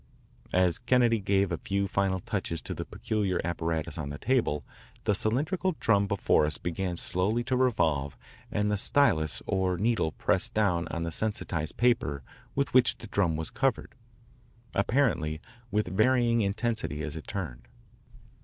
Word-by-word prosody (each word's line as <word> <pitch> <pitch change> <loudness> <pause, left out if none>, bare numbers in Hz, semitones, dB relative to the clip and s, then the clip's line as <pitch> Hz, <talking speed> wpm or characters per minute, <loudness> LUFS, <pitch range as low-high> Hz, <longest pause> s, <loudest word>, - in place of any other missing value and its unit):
As 90 -2 +3
Kennedy 120 -2 +3
gave 100 -1 +1
a 85 - -2
few 100 0 -1
final 95 -1 0
touches 85 0 -3
to - - -3
the - - -5
peculiar 100 -4 -1
apparatus 80 -1 -2
on 70 -2 -4
the 70 - -6
table, 105 - 0 0.4
the 105 - +2
cylindrical 155 - 0
drum 100 -2 +3
before 95 -6 +2
us 75 - -3
began 85 +1 -3
slowly 100 +8 0
to 130 +1 0
revolve 80 - +1 0.3
and 105 0 0
the 105 - +1
stylus 100 - +3
or 95 -2 0
needle 110 -5 +1
pressed 90 +1 0
down 90 -6 +2
on 85 0 -3
the 85 - -3
sensitised 85 -5 -2
paper 110 - +1 0.3
with 140 -1 0
which 130 -1 +4
the - - -10
drum 100 -6 +1
was 80 +1 -4
covered, 135 -4 -1 0.8
apparently 100 - +1 0.3
with 105 -1 +1
varying 120 +1 +3
intensity 105 -6 -1
as 80 -1 -4
it 80 - -8
turned. 65 -12 -5
100 Hz, 155 wpm, -28 LUFS, 85-115 Hz, 0.8 s, which